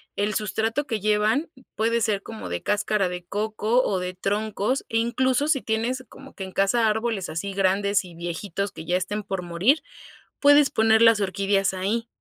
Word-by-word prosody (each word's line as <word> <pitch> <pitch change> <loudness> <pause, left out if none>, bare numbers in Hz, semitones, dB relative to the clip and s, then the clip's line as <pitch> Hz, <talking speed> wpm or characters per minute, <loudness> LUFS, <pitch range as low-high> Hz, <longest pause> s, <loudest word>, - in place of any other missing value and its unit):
el 205 +1 -1
sustrato 225 +7 -1
que 225 -4 -2
llevan, 215 - +1 0.3
puede 230 +2 +1
ser 210 -3 0
como 225 -1 -8
de 90 0 -4
cáscara 205 -2 +1
de 180 0 -6
coco 215 +5 0
o 195 -6 0
de 180 0 -4
troncos 210 +6 -1
e 225 - -1
incluso 260 +4 +1
si 270 -4 +2
tienes 235 +4 -2
como 270 +5 -14
que 190 - -6
en 190 - -10
casa 220 +4 +2
árboles 220 -2 -1
así 165 +6 -4
grandes 195 +1 +1
y 175 -2 -12
viejitos 175 +3 -4
que 160 - -9
ya 175 - 0
estén 205 +3 -3
por 195 -2 -3
morir 180 - +1 0.6
puedes 290 0 +6
poner 220 -3 +3
las 230 -2 +6
orquídeas 195 0 +1
ahí 210 +5 -2
210 Hz, 180 wpm, -24 LUFS, 195-230 Hz, 0.6 s, puedes